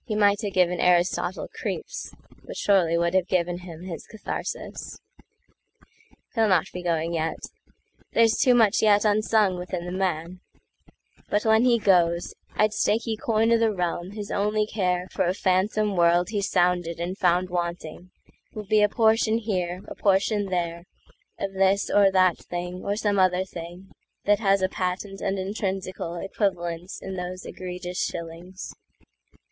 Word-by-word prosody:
He 215 Hz, -, -2 dB
might 205 Hz, 0 st, +3 dB
have 205 Hz, -3 st, -3 dB
given 180 Hz, -1 st, +2 dB
Aristotle 180 Hz, +1 st, +1 dB
creeps, -, -, -5 dB, 0.3 s
But -, -, -8 dB
surely 175 Hz, -5 st, +3 dB
would 170 Hz, +1 st, +1 dB
have 185 Hz, -1 st, +2 dB
given 175 Hz, -1 st, 0 dB
him 175 Hz, -2 st, -10 dB
his 180 Hz, -3 st, -7 dB
katharsis. 220 Hz, -, -6 dB, 1.4 s
He'll 225 Hz, -2 st, +3 dB
not 185 Hz, -5 st, +3 dB
be 180 Hz, -, -5 dB
going 170 Hz, -1 st, -1 dB
yet. 160 Hz, -1 st, -1 dB, 0.7 s
There's 225 Hz, -1 st, +4 dB
too 250 Hz, -1 st, +4 dB
much 225 Hz, -3 st, +4 dB
yetUnsung 210 Hz, -2 st, +3 dB
within 180 Hz, -1 st, -5 dB
the 175 Hz, -, -5 dB
man. 180 Hz, -1 st, -2 dB, 0.9 s
But 205 Hz, +2 st, 0 dB
when 220 Hz, +2 st, +4 dB
he 240 Hz, -2 st, +5 dB
goes, 175 Hz, -5 st, +2 dB, 0.2 s
I'd 215 Hz, 0 st, +2 dB
stake 215 Hz, +1 st, +1 dB
ye 225 Hz, -2 st, -1 dB
coin 225 Hz, +1 st, +1 dB
o' 230 Hz, -, +5 dB
the 225 Hz, -1 st, +3 dB
realm 180 Hz, 0 st, -3 dB
his 205 Hz, -1 st, -6 dB
only 210 Hz, +1 st, +1 dB
careFor 180 Hz, -4 st, -1 dB
a 185 Hz, -, -1 dB
phantom 200 Hz, +2 st, +1 dB
world 175 Hz, 0 st, +3 dB
he 210 Hz, -2 st, -1 dB
sounded 180 Hz, -3 st, +1 dB
and 175 Hz, +2 st, -3 dB
found 180 Hz, -1 st, +2 dB
wantingWill 175 Hz, 0 st, -4 dB, 0.6 s
be 215 Hz, 0 st, +4 dB
a 210 Hz, -, +4 dB
portion 220 Hz, 0 st, +3 dB
here, 185 Hz, -5 st, -2 dB
a -, -, -6 dB
portion 200 Hz, +1 st, +1 dB
there, 170 Hz, -2 st, -2 dB, 0.5 s
Of 195 Hz, 0 st, -4 dB
this 195 Hz, +1 st, +2 dB
or 200 Hz, -1 st, +5 dB
that 185 Hz, -2 st, +3 dB
thing 180 Hz, +1 st, -5 dB
or 200 Hz, -, -1 dB
some 205 Hz, -2 st, 0 dB
other 185 Hz, 0 st, +3 dB
thingThat 185 Hz, +3 st, -4 dB
has 195 Hz, -3 st, +2 dB
a -, -, +4 dB
patent 195 Hz, +2 st, -4 dB
and 195 Hz, -, -1 dB
intrinsicalEquivalence 185 Hz, -2 st, -3 dB
in 190 Hz, 0 st, -5 dB
those 180 Hz, +1 st, -5 dB
egregious 180 Hz, 0 st, -5 dB
shillings. 170 Hz, +3 st, -6 dB
185 Hz, 150 wpm, -25 LUFS, 175-205 Hz, 1.4 s, he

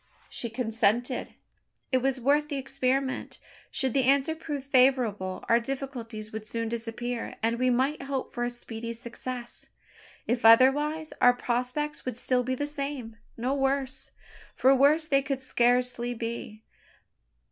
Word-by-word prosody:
She 235 Hz, -, -3 dB
consented. 230 Hz, +1 st, 0 dB, 0.6 s
It 260 Hz, -, +4 dB
was 265 Hz, 0 st, 0 dB
worth 290 Hz, +4 st, +2 dB
the 285 Hz, -, -2 dB
experiment. 265 Hz, 0 st, -1 dB, 0.3 s
Should 265 Hz, -4 st, 0 dB
the 265 Hz, -2 st, +2 dB
answer 275 Hz, +3 st, +3 dB
prove 295 Hz, -3 st, -5 dB
favourable, 250 Hz, -8 st, +2 dB
our 235 Hz, -, +5 dB
difficulties 235 Hz, -4 st, -6 dB
would 215 Hz, 0 st, -6 dB
soon 230 Hz, 0 st, -3 dB
disappear, 235 Hz, +1 st, -4 dB
and 230 Hz, +1 st, +1 dB
we 255 Hz, 0 st, +3 dB
might 260 Hz, +5 st, +1 dB
hope 275 Hz, -1 st, -4 dB
for 240 Hz, -, -2 dB
a 240 Hz, -, 0 dB
speedy 230 Hz, -1 st, -6 dB
success. 240 Hz, +1 st, -7 dB, 0.6 s
If 240 Hz, +1 st, -1 dB
otherwise, 290 Hz, +7 st, +5 dB
our 245 Hz, -, +7 dB
prospects 250 Hz, +5 st, -2 dB
would 255 Hz, -3 st, -4 dB
still 250 Hz, 0 st, +1 dB
be 255 Hz, +1 st, -1 dB
the 290 Hz, -, -2 dB
same 280 Hz, -6 st, -3 dB, 0.2 s
no 250 Hz, +4 st, 0 dB
worse: 270 Hz, -1 st, -1 dB, 0.5 s
for 265 Hz, +1 st, +5 dB
worse 290 Hz, +4 st, +4 dB
they 275 Hz, -2 st, +3 dB
could 275 Hz, -1 st, -2 dB
scarcely 245 Hz, -1 st, +1 dB
be. 230 Hz, -1 st, -5 dB
250 Hz, 145 wpm, -28 LUFS, 235-275 Hz, 0.6 s, our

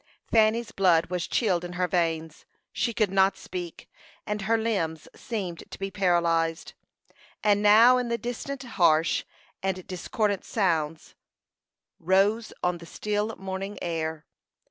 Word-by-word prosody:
Fanny's 225 Hz, +1 st, +3 dB
blood 175 Hz, -3 st, +3 dB
was 180 Hz, -1 st, -2 dB
chilled 185 Hz, -7 st, +1 dB
in 175 Hz, 0 st, -6 dB
her 180 Hz, 0 st, 0 dB
veins; 165 Hz, -2 st, -1 dB, 0.3 s
she 235 Hz, -, 0 dB
could 215 Hz, -4 st, 0 dB
not 195 Hz, 0 st, +3 dB
speak, 175 Hz, -2 st, -7 dB, 0.4 s
and 210 Hz, 0 st, -3 dB
her 225 Hz, +4 st, +2 dB
limbs 180 Hz, -9 st, -2 dB
seemed 190 Hz, -8 st, -5 dB
to -, -, -9 dB
be 195 Hz, 0 st, -4 dB
paralyzed. 170 Hz, -4 st, +1 dB, 0.7 s
And 205 Hz, -1 st, +3 dB
now 225 Hz, +5 st, +7 dB
in 245 Hz, -1 st, -2 dB
the 235 Hz, -, 0 dB
distance 245 Hz, +4 st, -5 dB
harsh 170 Hz, -9 st, +2 dB, 0.4 s
and 190 Hz, -1 st, -2 dB
discordant 200 Hz, +2 st, -2 dB
sounds 165 Hz, -6 st, -1 dB, 0.9 s
rose 200 Hz, +6 st, +2 dB
on 180 Hz, -1 st, 0 dB
the 170 Hz, -, -12 dB
still 210 Hz, +3 st, -2 dB
morning 195 Hz, +1 st, -5 dB
air. 160 Hz, -2 st, -3 dB
190 Hz, 135 wpm, -26 LUFS, 170-215 Hz, 0.9 s, now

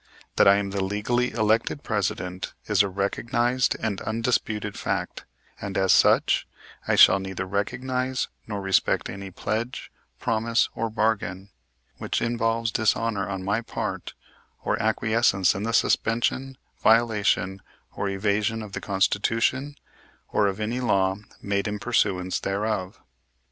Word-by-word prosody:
That -, -, +6 dB
I 100 Hz, -, +8 dB
am 100 Hz, -1 st, -1 dB
the 100 Hz, -1 st, -1 dB
legally 110 Hz, +6 st, 0 dB
elected 115 Hz, +5 st, 0 dB
President 95 Hz, -3 st, -3 dB
is 105 Hz, -2 st, +3 dB
a 100 Hz, -, +1 dB
recognized 120 Hz, +6 st, 0 dB
and 105 Hz, -3 st, -2 dB
undisputed 110 Hz, -2 st, -1 dB
fact, -, -, -3 dB, 0.4 s
and, 100 Hz, -1 st, -4 dB
as 95 Hz, -1 st, +4 dB
such, -, -, +4 dB, 0.4 s
I -, -, +3 dB
shall 95 Hz, -, +7 dB
neither 95 Hz, -1 st, -4 dB
recognize 125 Hz, +6 st, -2 dB, 0.2 s
nor 105 Hz, -2 st, -4 dB
respect 95 Hz, 0 st, +1 dB
any 100 Hz, 0 st, -7 dB
pledge, 110 Hz, +6 st, -4 dB, 0.3 s
promise 115 Hz, -, +1 dB
or 115 Hz, 0 st, -2 dB
bargain 105 Hz, -3 st, -1 dB, 0.5 s
which -, -, -1 dB
involves 115 Hz, -1 st, 0 dB
dishonor 110 Hz, -1 st, 0 dB
on 95 Hz, -1 st, -4 dB
my 105 Hz, +4 st, 0 dB
part -, -, -5 dB, 0.5 s
or -, -, +1 dB
acquiescence 110 Hz, -4 st, +2 dB
in 95 Hz, -, -4 dB
the 115 Hz, +2 st, -1 dB
suspension, 120 Hz, +3 st, +1 dB, 0.2 s
violation 105 Hz, -4 st, +2 dB, 0.3 s
or 100 Hz, -, -2 dB
evasion 105 Hz, +3 st, 0 dB
of 105 Hz, -, -9 dB
the -, -, -4 dB
Constitution 115 Hz, +8 st, 0 dB, 0.5 s
or 105 Hz, -, +2 dB
of 100 Hz, +1 st, -3 dB
any 110 Hz, +4 st, -2 dB
law 95 Hz, -6 st, +1 dB, 0.3 s
made 100 Hz, 0 st, -1 dB
in 105 Hz, 0 st, -2 dB
pursuance 100 Hz, -5 st, 0 dB
thereof. 100 Hz, -1 st, -2 dB
105 Hz, 135 wpm, -25 LUFS, 100-115 Hz, 0.5 s, I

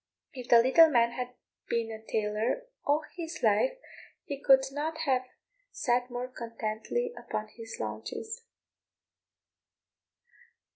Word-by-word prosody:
If 250 Hz, -3 st, -8 dB
the 235 Hz, -1 st, +8 dB
little 320 Hz, +6 st, +7 dB
man 235 Hz, -4 st, +4 dB
had 250 Hz, 0 st, -5 dB, 0.3 s
been 230 Hz, -1 st, 0 dB
a 220 Hz, 0 st, -8 dB
tailor 220 Hz, -, -1 dB, 0.2 s
all 295 Hz, +2 st, +2 dB
his 335 Hz, -1 st, -6 dB
life -, -, +3 dB, 0.5 s
he 280 Hz, -1 st, -5 dB
could 265 Hz, -1 st, +6 dB
not 305 Hz, +3 st, -2 dB
have 255 Hz, -2 st, +1 dB, 0.4 s
sat 245 Hz, -1 st, 0 dB
more 245 Hz, +1 st, -3 dB
contentedly 230 Hz, -, -3 dB
upon 215 Hz, 0 st, -4 dB
his 225 Hz, 0 st, -9 dB
haunches. 110 Hz, -, -5 dB
250 Hz, 115 wpm, -30 LUFS, 225-295 Hz, 0.5 s, the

